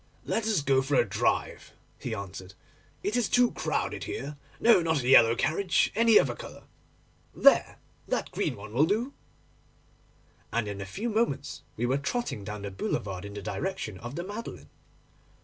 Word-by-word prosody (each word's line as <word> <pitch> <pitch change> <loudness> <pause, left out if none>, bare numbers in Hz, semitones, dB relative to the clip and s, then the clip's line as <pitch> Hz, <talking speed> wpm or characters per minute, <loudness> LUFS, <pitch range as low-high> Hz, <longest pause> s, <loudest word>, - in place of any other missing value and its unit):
'Let 225 -1 -1
us 205 -10 +1
go 135 -1 +3
for 135 +2 -1
a 120 - +4
drive,' 110 +3 -1 0.3
he 115 - -4
answered, 95 -1 -8 0.5
'it 205 +3 -1
is 240 -4 +1
too 245 -1 +4
crowded - - -2
here. 140 +4 -5 0.2
No, 230 -5 +6
not 160 -5 0
a - - -2
yellow 115 -3 +7
carriage, 180 +8 +1
any 225 0 +5
other 125 -3 +1
colour—there, - - -1 0.3
that - - -22
dark - - -1
green - - -1
one 110 - -10
will 145 +6 +4
do'; 230 +8 0 1.4
and 115 -2 0
in 100 -1 -5
a 95 - -6
few 205 - -4
moments 150 - -1 0.2
we 120 - 0
were 130 +3 +1
trotting 240 - -3
down 105 0 -6
the 100 - -4
boulevard 95 0 -3
in 100 0 -8
the 100 - -6
direction 180 - -4
of 120 +3 -7
the 175 - -3
Madeleine. 205 +5 -7
135 Hz, 170 wpm, -28 LUFS, -, 1.4 s, yellow